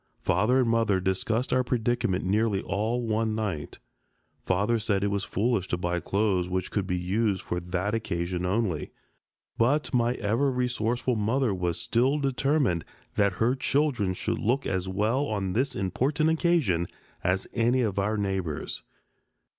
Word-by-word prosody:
Father 110 +9 +3
and 125 - +1
mother 115 -4 +2
discussed 105 +6 0
our 130 0 +3
predicament 120 -6 0
nearly 105 +1 +1
all 115 +5 -1
one 110 0 0
night. 95 -10 -3 0.7
Father 105 +5 +2
said 100 -2 0
it 100 - +1
was 100 -1 -1
foolish 105 -2 0
to 90 - -1
buy 90 0 -1
clothes 95 -2 0
which 95 0 -2
could 100 -3 -1
be 90 - 0
used 95 +2 0
for 90 - -2
that 90 +4 -2
occasion 90 -5 -2
only. 90 -4 0 0.7
But 140 +7 +2
my 120 0 +2
ever 115 +6 +1
resourceful 125 -1 0
mother 115 +2 +1
was 90 -3 -1
still 120 - +2
determined 135 - +1 0.3
that 100 -2 +2
her 115 +6 +2
children 130 -8 +1
should - - -2
look 125 +6 +1
as 95 -1 -1
well 110 +9 +1
on 100 -3 -2
this 130 +3 0
important 140 - +1
occasion 155 - +2 0.4
as 95 +1 +1
any 120 +2 +2
of 100 -3 -1
our 105 +2 0
neighbors. 95 -7 -2
105 Hz, 155 wpm, -27 LUFS, 95-125 Hz, 0.7 s, Father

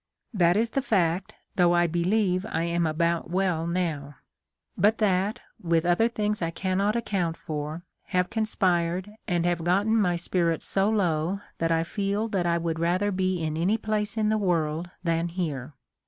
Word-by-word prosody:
That 175 -2 +3
is 230 +1 +1
the 275 - 0
fact, 185 -7 0 0.2
though 175 -1 +4
I 175 0 +4
believe 180 +3 +1
I 160 - -1
am 170 0 0
about 170 +2 0
well 180 -3 0
now; 160 -5 -2 0.6
but 215 +2 +3
that, 200 0 +1 0.2
with 165 -1 +1
other 175 +6 +3
things 210 -3 -2
I 165 - 0
cannot 190 +4 0
account 185 -8 -1
for, 155 +2 -5 0.2
have 180 0 0
conspired, 185 -4 0 0.2
and 175 -3 +1
have 175 -2 0
gotten 200 +6 +2
my 190 -6 +2
spirits 170 -1 -1
so 195 +1 +1
low 185 -2 0 0.2
that 165 0 +1
I 165 0 +2
feel 200 +4 -1
that 185 -5 0
I 170 0 +2
would 165 -1 -2
rather 180 +5 +1
be 185 -2 0
in 155 -1 -2
any 180 +7 +1
place 215 0 -2
in 215 -1 +2
the 215 0 +2
world 170 -3 0
than 165 0 0
here. 155 -6 -4
175 Hz, 170 wpm, -26 LUFS, 170-200 Hz, 0.6 s, though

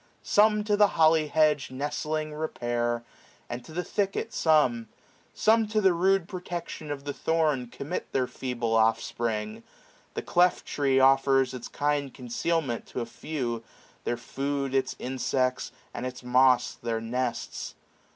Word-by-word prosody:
Some 210 0 +4
to 210 0 +2
the 205 0 +6
holly 160 -1 +5
hedge 150 -1 +2
Nestling 150 +3 -3
repair^ 120 -6 -2 0.4
and 120 0 -6
to - - -13
the 180 +3 -2
thicket 195 +3 -2
some; 130 -8 +3 0.5
Some 225 0 +3
to 215 0 +1
the 190 -3 +4
rude 185 +1 +2
protection 175 -4 -6
of 145 -1 -4
the 145 0 -4
thorn 155 -6 +1
635 120 - -17
Commit 150 +6 -4
their 130 -1 +1
feeble 125 -2 -3
oflFspring: 110 -1 0 0.5
The - - -3
cleft 180 +1 +3
tree 135 -2 +1
Offers 135 0 +4
its 125 -2 -6
kind 145 -1 -1
concealment 130 +1 -2
to 125 - -4
a - - -2
few; 120 -2 -4 0.4
Their 120 - -1
food 140 +2 -3
its 135 -1 0
insects, 130 0 -1 0.2
and - - -5
its 125 0 -5
moss 125 0 +4
their 115 -1 -1
nests. 120 +2 -3
135 Hz, 145 wpm, -27 LUFS, 125-160 Hz, 0.5 s, the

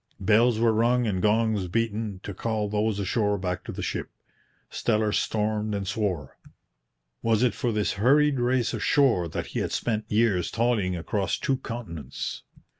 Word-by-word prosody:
Bells 110 +4 +4
were 115 0 +3
rung 120 +2 +2
and 95 -4 -1
gongs 110 -2 +2
beaten 110 -1 -2
to 100 - -5
call 110 +2 -2
those 105 0 0
ashore 105 +1 0
back 90 -1 -3
to - - -5
the - - -5
ship. - - -3 0.6
Steller 110 -2 0
stormed 105 -1 0
and 100 -1 -3
swore. 95 - -2 0.8
Was 115 0 +2
it 125 - +3
for 120 - -1
this 105 -2 0
hurried 145 +3 +4
race 120 -1 +1
ashore 115 -4 +2
that 80 - -4
he - - -1
had - - -2
spent 110 -2 -2
years 105 -5 +2
toiling 110 -6 +1
across 95 +4 -1
two 135 -2 0
continents? 85 - -6
110 Hz, 160 wpm, -26 LUFS, 100-115 Hz, 0.8 s, Bells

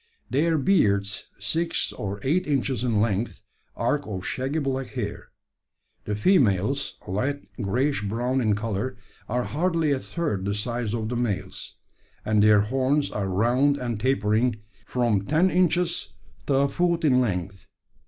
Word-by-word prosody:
Their 160 +4 +2
beards, 105 - +2
six 160 +12 -1
or 100 0 -4
eight 170 +7 +1
inches 135 -4 0
in 115 -4 +1
length, 110 +1 -1 0.3
arc 140 +5 0
of 95 -3 -5
shaggy 135 +4 -2
black 135 -3 -1
hair. - - -5 0.8
The 105 - -1
females, 125 - +2
light 130 +10 -2
greyish 125 +7 0
brown 120 +6 0
in 110 -3 +2
colour, 115 +4 -3 0.3
are 125 +2 0
hardly 165 +1 0
a 135 - +1
third 130 - -3
the 100 0 0
size 120 +1 -2
of 110 -1 -3
the 125 - -2
males; 120 -5 -3 0.5
and 105 -1 +3
their 105 -1 +6
horns 135 +6 +1
are 100 -2 -2
round 120 +9 +2
and 120 -5 -3
tapering, 115 -1 +2 0.3
from 120 -6 +1
ten 165 - +3
inches 175 - +1 0.3
to 140 - +2
a 140 +1 +4
foot 170 +2 0
in 130 -3 +5
length. 95 -4 -3
125 Hz, 145 wpm, -25 LUFS, 105-140 Hz, 0.8 s, their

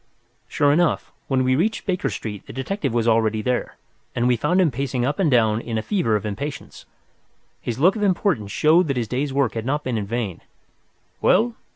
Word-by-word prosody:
Sure 145 0 +2
enough, 170 +3 +1 0.2
when 130 -2 +1
we 130 0 +2
reached 210 +10 0
Baker 180 -8 -1
Street 105 -1 -6
the - - -9
detective 195 - -2
was 115 0 0
already 110 -1 +2
there, 125 +2 -1 0.4
and 120 0 +1
we 125 - +4
found 165 - +1
him 175 -5 +3
pacing 130 -1 -2
up 145 +2 -2
and 180 -5 +3
down 115 -4 +3
in 115 -2 -4
a 110 - -2
fever 175 - 0
of 105 - -2
impatience. 130 +8 -6 0.8
His 120 -2 -4
look 180 - +4
of 215 - -4
importance 180 - +1
showed 160 +3 +4
that 140 -3 -1
his 120 -2 -1
day's 135 +5 -2
work 135 -3 +1
had 115 - -3
not 145 +5 -1
been 120 -3 -1
in 100 - -5
vain. 110 -5 -3 0.8
"Well?" 235 +2 +3
130 Hz, 205 wpm, -22 LUFS, 115-155 Hz, 0.8 s, we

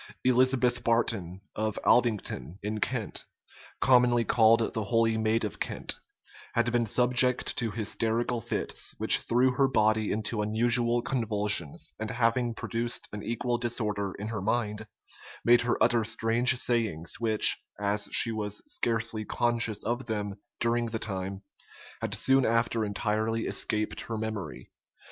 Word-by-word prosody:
Elizabeth 125 -1 +2
Barton, 105 -6 0
of 110 -1 -2
Aldington, 105 - +1
in 105 +1 -3
Kent, 115 -2 -3 0.5
commonly 125 -2 +4
called 115 0 +3
the 110 -2 -2
"holy 115 +1 +2
maid 110 +1 0
of 105 - -6
Kent," - - -2 0.6
had 115 0 +1
been 120 -1 +1
subject 125 +2 +3
to 120 -3 0
hysterical 115 +2 -1
fits, - - -2
which - - +6
threw 125 +2 +2
her 135 +1 +2
body 110 -3 +1
into 110 +1 -2
unusual 120 +2 +2
convulsions; 105 - -1
and 110 0 -4
having 115 0 0
produced 120 +1 -3
an 105 - -5
equal 120 +2 -2
disorder 105 -5 -1
in 105 +2 -5
her 110 -4 -4
mind, 110 0 -2 0.6
made 120 0 +6
her 120 0 0
utter 115 -1 +3
strange 115 +3 +3
sayings, 110 -10 -1
which, 110 -2 +4 0.2
as 105 +1 0
she 115 - +3
was 105 -2 -4
scarcely 115 - -1
conscious 115 -1 0
of 120 +2 -3
them 105 -3 -3 0.3
during 120 0 +1
the 115 0 -3
time, 95 -2 -5 0.6
had - - -2
soon 135 0 +3
after 115 -1 +1
entirely 110 +2 -1
escaped 105 0 -1
her 115 - -5
memory. 100 - -6
115 Hz, 140 wpm, -28 LUFS, 105-120 Hz, 0.6 s, which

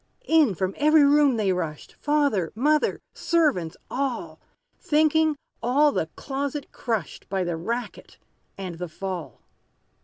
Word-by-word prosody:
In, 310 - +4
from 190 +2 -1
every 305 +1 +5
room 285 -3 +4
they 200 -3 +2
rushed, 160 -4 -5
Father 285 - +1
mother 300 +6 +2
servants 295 - +1
all, 240 - -3 0.4
Thinking 310 0 +3 0.3
all 280 +6 +3
the 160 - -1
closet 280 +1 -4
crushed, 225 -8 -4
By 190 -1 0
the 175 -1 -2
racket 235 +9 -5 0.4
and 180 -4 -6
the 180 -1 -4
fall. 185 0 -6
245 Hz, 125 wpm, -25 LUFS, 185-295 Hz, 0.4 s, every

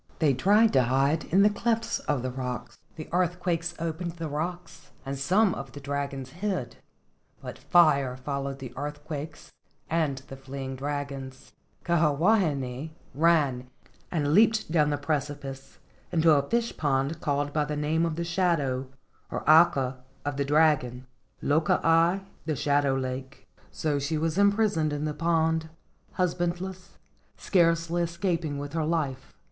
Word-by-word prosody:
They 150 -4 +3
tried 205 - +4
to 130 - +5
hide 135 +5 +1
in 195 +4 +4
the 210 - +6
clefts 230 +2 -1
of 140 -4 -2
the 130 - -2
rocks. 125 -1 -5 0.2
The 155 - -7
earthquakes 175 -1 0
opened 165 +1 -3
the 165 -1 -5
rocks 170 +4 -5 0.2
and 135 +1 -3
some 185 +9 +2
of 135 -2 -7
the 145 - -8
dragons 140 -2 -4
hid, 180 - -3 0.6
but - - -8
fire 140 -7 +3
followed 140 +1 -4
the 130 -3 -8
earthquakes 150 +2 -6 0.4
and 155 -5 +1
the 135 - -8
fleeing 135 0 -6
dragons. 135 -1 -5 0.3
Kiha 155 -4 +2
wahine 155 - +1 0.2
ran 145 -5 +2 0.4
and 150 -4 0
leaped 220 -2 +4
down 150 -3 +3
the 145 - 0
precipice 140 -2 -4 0.3
into 165 -1 +4
a 140 -2 +2
fish 235 0 0
pond 140 +1 0
called 145 0 -1
by 150 - +2
the 150 0 -3
name 155 +2 +1
of 165 -2 -1
the 170 - -2
shadow, 165 -7 0 0.4
or - - -5
aka, 140 -5 +5 0.3
of 145 -1 -2
the 140 - 0
dragon, 140 -4 +2 0.4
Loko 155 +2 +2
aka 165 +4 +3 0.2
(the 155 - 0
shadow 140 0 +2
lake). 130 +1 -5 0.2
So 150 -2 -1
she 150 +3 -1
was 165 +3 -1
imprisoned 200 -7 +2
in 145 +1 -2
the 150 - -2
pond, 160 0 +1 0.5
husband¬ 175 -1 0
less, 185 0 -8 0.4
scarcely 170 -1 +2
escaping 170 -3 -1
with 145 +1 -6
her 165 -1 0
life. 145 -5 -2
155 Hz, 150 wpm, -27 LUFS, 140-170 Hz, 0.6 s, the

